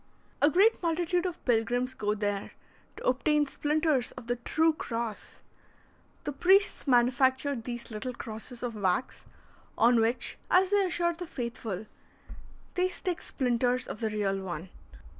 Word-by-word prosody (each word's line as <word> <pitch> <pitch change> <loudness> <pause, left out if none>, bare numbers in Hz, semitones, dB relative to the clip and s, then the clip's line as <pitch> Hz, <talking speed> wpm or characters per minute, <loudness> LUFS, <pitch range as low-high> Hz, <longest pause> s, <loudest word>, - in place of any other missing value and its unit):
A 290 - +6
great 395 +8 +4
multitude 345 +1 +1
of 355 -1 -7
pilgrims 245 +2 +1
go 210 -4 -1
there 205 -1 -2 0.4
to - - -9
obtain 295 +4 +3
splinters 295 -2 0
of - - -10
the 245 +1 -1
true 320 +6 +2
cross. 230 -7 -5 0.8
The 290 - -2
priests 380 +5 +3
manufacture 260 +2 +3
little 240 0 -5
crosses 230 +2 -7
of 240 -2 -2
wax, 200 +2 -1 0.5
on 235 0 +5
which, 230 +3 0
as 375 +1 +4
they 405 -2 +4
assure 345 0 0
the 350 +1 -7
faithful, 230 - -5 0.9
they 365 0 +1
stick 360 -1 -3
splinters 250 -1 0
of - - -6
the 220 - -1
real 200 -2 -1
one. 180 -1 -5
250 Hz, 140 wpm, -29 LUFS, 225-320 Hz, 0.9 s, A